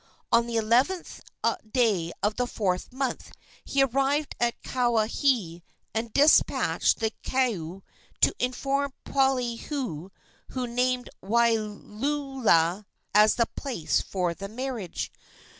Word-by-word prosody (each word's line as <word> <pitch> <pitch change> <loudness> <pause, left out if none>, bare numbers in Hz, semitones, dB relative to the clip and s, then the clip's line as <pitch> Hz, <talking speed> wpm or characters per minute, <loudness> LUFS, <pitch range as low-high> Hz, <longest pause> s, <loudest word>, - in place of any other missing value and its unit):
On 235 0 +4
the 235 - -4
11th 245 +11 +1 0.5
day 210 -10 +2
of 210 +1 +1
the 245 0 0
fourth 185 -4 -2
month 260 -1 -3 0.3
he 275 -1 +2
arrived 275 +3 0
at 235 0 0
Kawaihae, 230 - +1 0.3
and 225 +1 -2
despatched 290 +6 +4
the 220 -1 -1
koae 195 -9 -1 0.4
to - - +5
inform 275 +2 -1
Poliahu, 250 - -1 0.4
who 255 -1 -2
named 250 +1 0
Waiulaula 220 - +1 0.3
as 210 +1 +6
the 235 - +3
place 245 - -1
for 180 -3 -2
the 195 +3 -7
marriage. 235 -5 -4
235 Hz, 110 wpm, -27 LUFS, 210-265 Hz, 0.5 s, as